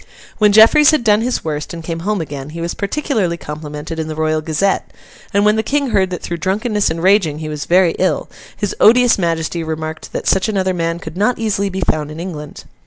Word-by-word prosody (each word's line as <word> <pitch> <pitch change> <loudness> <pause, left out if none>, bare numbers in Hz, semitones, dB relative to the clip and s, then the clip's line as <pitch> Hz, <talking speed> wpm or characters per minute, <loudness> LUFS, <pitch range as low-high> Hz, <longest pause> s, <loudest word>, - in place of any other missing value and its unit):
When 210 -1 +5
Jeffreys 225 +8 +7
had 310 -6 +2
done 210 -1 +3
his 245 -4 -2
worst, 150 +1 -4
and 165 - -8
came 165 0 -4
home 200 +2 -1
again, 145 -2 -6
he 165 +2 -8
was 170 +1 -3
particularly 205 - -1
complimented 150 +1 -7
in 160 - -3
the 155 - -5
Royal 155 0 0
Gazette; 160 +5 0 0.4
and 200 +1 +2
when 210 +1 +3
the - - +2
King 280 +1 -1
heard 190 -3 +2
that 180 -2 -6
through 170 - -3
drunkenness 205 +5 0
and 165 +1 -4
raging 190 -6 +3
he 155 0 -5
was 150 -1 -5
very 180 -1 +4
ill, 185 - 0 0.3
his 205 -2 -2
odious 245 +1 +5
Majesty 165 -1 -1
remarked 160 0 -5
that - - -4
such 190 +3 +2
another 190 -3 0
man 165 -1 -1
could 160 -1 -9
not 215 +5 +1
easily 200 -3 -1
be 190 0 -4
found 150 -1 -1
in 155 +1 -8
England. 155 -4 -7
180 Hz, 220 wpm, -17 LUFS, 160-210 Hz, 0.4 s, Jeffreys